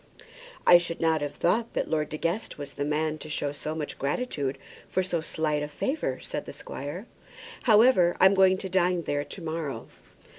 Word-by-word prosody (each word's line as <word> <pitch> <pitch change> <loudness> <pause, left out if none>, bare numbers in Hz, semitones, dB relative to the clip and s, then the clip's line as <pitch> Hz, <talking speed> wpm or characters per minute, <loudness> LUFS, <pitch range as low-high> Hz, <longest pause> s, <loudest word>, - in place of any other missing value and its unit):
"I 175 - +9
should 170 -1 -4
not 160 -2 +2
have 145 0 -3
thought 225 +7 +1
that - - 0
Lord 155 -2 -1
De 155 - -4
Guest 170 +8 -2
was 145 -1 -7
the 145 - -3
man 155 +1 -1
to 155 - -8
show 145 -1 -1
so 150 +2 -5
much 150 -2 -5
gratitude 140 - -2 0.3
for 185 - +1
so 175 -3 -1
slight 155 -2 -1
a 150 - -2
favour," 150 - -2
said - - -5
the - - -8
squire. 145 - -6 0.6
"However, 215 -6 +5
I'm 190 +1 +7
going 190 -1 +5
to 190 - -4
dine 180 -2 +1
there 145 -1 -1
to 185 - -9
morrow." 155 -7 -4
160 Hz, 190 wpm, -27 LUFS, 150-185 Hz, 0.6 s, I